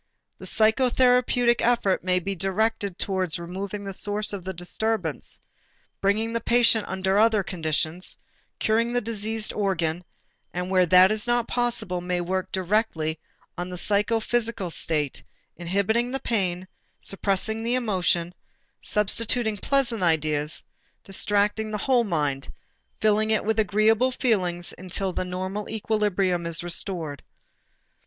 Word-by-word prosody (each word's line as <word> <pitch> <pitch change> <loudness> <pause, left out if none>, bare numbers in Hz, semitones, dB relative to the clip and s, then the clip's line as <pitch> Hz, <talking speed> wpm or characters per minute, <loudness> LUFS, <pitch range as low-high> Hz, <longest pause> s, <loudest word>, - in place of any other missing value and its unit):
The - - -9
psychotherapeutic 245 +1 +3
effort 235 -5 +2
may 180 0 +2
be 195 +3 -3
directed 195 +1 -1
toward 185 -4 -1
removing 190 +4 -5
the 195 -1 -5
source 205 +2 +1
of 195 -3 -5
the 190 - -4
disturbance, 180 - -2 0.6
bringing 215 +3 +1
the 230 - 0
patient 235 -2 +3
under 190 +1 0
other 220 -2 +4
conditions, 160 0 -2 0.4
curing 230 +2 +1
the 245 - +2
diseased 220 0 -2
organ, 180 -4 -1 0.5
and 180 +1 -3
where 185 -1 +4
that 185 +2 +7
is 215 +2 -1
not 240 -1 +1
possible, 230 -7 -1
may 180 0 -1
work 185 +1 -2
directly 180 -5 0 0.4
on 180 +1 -3
the 180 - -6
psychophysical 220 0 0
state, 150 -4 -1 0.3
inhibiting 200 +7 0
the 270 - -1
pain, 185 -5 -1 0.3
suppressing 200 +3 -1
the 235 +2 0
emotion, 180 -7 0 0.5
substituting 220 +2 +1
pleasant 250 0 0
ideas, 155 -3 0 0.4
distracting 205 +2 +1
the 215 - -2
whole 245 +3 +2
mind, 145 -7 -1 0.5
filling 215 0 +2
it 220 -1 +1
with 220 0 +1
agreeable 220 +4 +3
feelings, 185 -9 0
until 185 +1 -3
the - - -1
normal 185 +3 -4
equilibrium 200 -5 0
is 170 0 0
restored. 170 -4 -3
200 Hz, 130 wpm, -25 LUFS, 180-220 Hz, 0.6 s, that